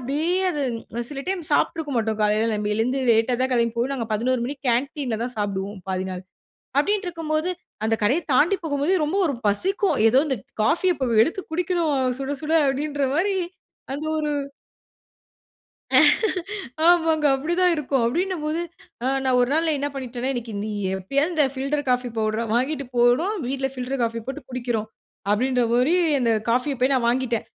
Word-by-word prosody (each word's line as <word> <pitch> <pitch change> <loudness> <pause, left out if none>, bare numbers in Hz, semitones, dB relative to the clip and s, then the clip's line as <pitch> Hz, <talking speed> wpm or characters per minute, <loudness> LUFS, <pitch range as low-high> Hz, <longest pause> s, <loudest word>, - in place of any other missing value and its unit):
அப்படியே 285 +7 -1 0.2
அது 295 -4 -2 0.5
சில 275 -2 -5
டைம் 375 -1 -2
சாப்பிட்டுருக்க 305 0 +1
மாட்டோம். 220 -1 0
காலைல 210 +2 +2
நம்ம 210 0 -2
எழுந்து 250 +5 0
லேட்டா 225 +2 +3
தான் 260 - 0
கிளம்பி 235 -2 +1
போய், 245 +4 0
நாங்க 245 -4 -3
11 245 +4 +1
மணிக்கு 280 +2 -6
கேன்டீன்ல 255 -1 -1
தான் 250 +1 -5
சாப்பிடுவோம், 200 -1 -3
பாதி 185 0 -2
நாள். 180 0 -6 0.6
அப்படின்ட்டு 405 +6 +1
இருக்கும்போது, 325 0 -2 0.3
அந்த 225 +1 +2
கடைய 255 +10 +3
தாண்டி 320 +9 +4
போகும்போதே 295 +3 +1
ரொம்ப 325 +6 -1
ஒரு 285 - -1
பசிக்கும். 380 - +1
ஏதோ 250 - +3
இந்த 265 -3 -1 0.3
காஃபிய 355 - +3
இப்போ 265 -3 -2 0.2
எடுத்து 335 +7 -3
குடிக்கணும்! 330 -4 0 0.2
சுட 275 +1 -2
சுட! 310 +1 -1
அப்படின்ற 285 +1 -1
மாரி 385 +5 +1 0.6
அந்த 290 +3 -4
ஒரு 300 -1 -1 2.6
ஆமாங்க. 325 -3 +3
அப்படி 305 +6 -3
தான் 360 -1 +4
இருக்கும். 275 -4 0
அப்படின்னும் 350 +6 -1
போது, 310 +2 -1 0.4
ஆ - - +1 0.2
நான் 260 -1 +3
ஒரு 245 - +3
நாள் 325 +2 +2
நா - - +3
என்ன 285 +1 -1
பண்ணிட்டேன்னா, 255 -1 -3
"இன்னிக்கு 240 -3 -5
நீ 215 - -4 0.3
எப்படியாவது 275 - 0
இந்த 305 -2 +4
ஃபில்டர் 275 +2 -2
காஃபி 250 0 +1
பவுடர 215 +1 0
வாங்கிட்டு 280 +4 0
போணும். 245 - +3
வீட்ல 270 +1 -1
ஃபில்டர் 255 +1 -3
காஃபி 230 0 -1
போட்டு 265 - -5
குடிக்கிறோம்." 240 -4 -2 0.4
அப்படின்ற 250 +4 +2
மாரி 250 +8 +3 0.3
அந்த 235 -2 +2 0.2
காஃபிய 255 +4 +1
போய் 260 +2 +3
நான் 245 -3 +1
வாங்கிட்டேன். 240 -2 0
265 Hz, 165 wpm, -23 LUFS, 235-310 Hz, 2.6 s, தாண்டி